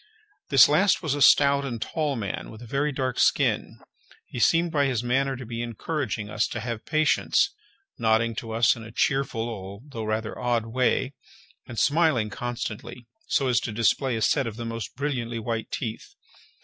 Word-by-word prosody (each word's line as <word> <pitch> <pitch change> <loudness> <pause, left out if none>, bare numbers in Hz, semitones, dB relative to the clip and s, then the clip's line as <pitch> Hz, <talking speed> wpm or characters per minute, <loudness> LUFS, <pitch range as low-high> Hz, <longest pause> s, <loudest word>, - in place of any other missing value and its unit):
This 135 -3 +8
last 185 +6 +3
was 155 -4 0
a 145 - -3
stout 140 0 +6
and 120 -4 -4
tall 150 +4 -2
man, 100 -5 -4
with 110 - -11
a - - -9
very 140 +5 0
dark 130 -2 -2
skin. - - +2 0.5
He 125 - -7
seemed 165 +6 +3
by 145 -3 +2
his 125 -3 -1
manner 135 +2 +1
to 130 0 -8
be 115 0 -5
encouraging 120 - -3
us 105 +1 0
to 115 - -5
have 115 -1 -5
patience, 155 - +2 0.5
nodding 115 +1 +2
to 115 - -5
us 115 0 +3
in 115 - -9
a 115 - -10
cheerful 125 -2 0
although 110 +4 -7
rather 110 0 -3
odd 120 -2 0
way, 130 +3 0 0.5
and 120 - -8
smiling 145 -8 +2
constantly, 120 +1 -5 0.2
so 135 -3 +1
as 125 -1 +3
to 115 - -4
display 115 +3 +1
a 110 - -1
set 135 +1 +2
of 110 - -5
the 115 0 -6
most 115 -2 -5
brilliantly 125 -4 -2
white 115 0 -3
teeth. 115 -1 -5
120 Hz, 180 wpm, -25 LUFS, 115-140 Hz, 0.5 s, This